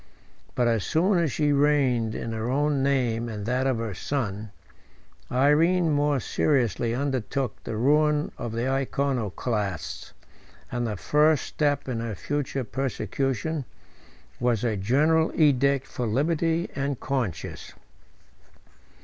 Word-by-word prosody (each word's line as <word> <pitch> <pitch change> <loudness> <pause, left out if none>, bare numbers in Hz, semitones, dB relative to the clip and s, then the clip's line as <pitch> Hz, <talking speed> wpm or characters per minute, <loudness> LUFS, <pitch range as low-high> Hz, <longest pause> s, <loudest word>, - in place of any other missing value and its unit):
But 120 - +2
as 115 -4 +1
soon 175 +3 +2
as 165 -4 +1
she 150 +1 +1
reigned 135 -6 +2
in 115 - -4
her 110 +1 -3
own 145 +1 +1
name 120 -4 +1
and 105 -2 -5
that 125 +3 0
of 130 -3 +1
her 115 -2 -3
son, 105 - -3 0.8
Irene 160 +6 +3
more 145 -1 +2
seriously 120 -4 +1
undertook 130 -3 -2
the 110 - -4
ruin 150 +4 +2
of 120 - -5
the 115 +3 -2
Iconoclasts; 120 - -2 0.6
and 120 -1 -1
the 105 -3 -3
first 150 +6 +3
step 145 -2 -1
of 120 -3 -2
her 115 -2 -3
future 140 +3 -2
persecution 135 - -2 0.8
was 120 -3 +1
a 115 -3 +1
general 150 +11 +2
edict 140 -2 +3
for 120 - -4
liberty 165 +7 +1
of 140 -2 -2
conscience. 120 - -3
135 Hz, 125 wpm, -26 LUFS, 115-145 Hz, 0.8 s, Irene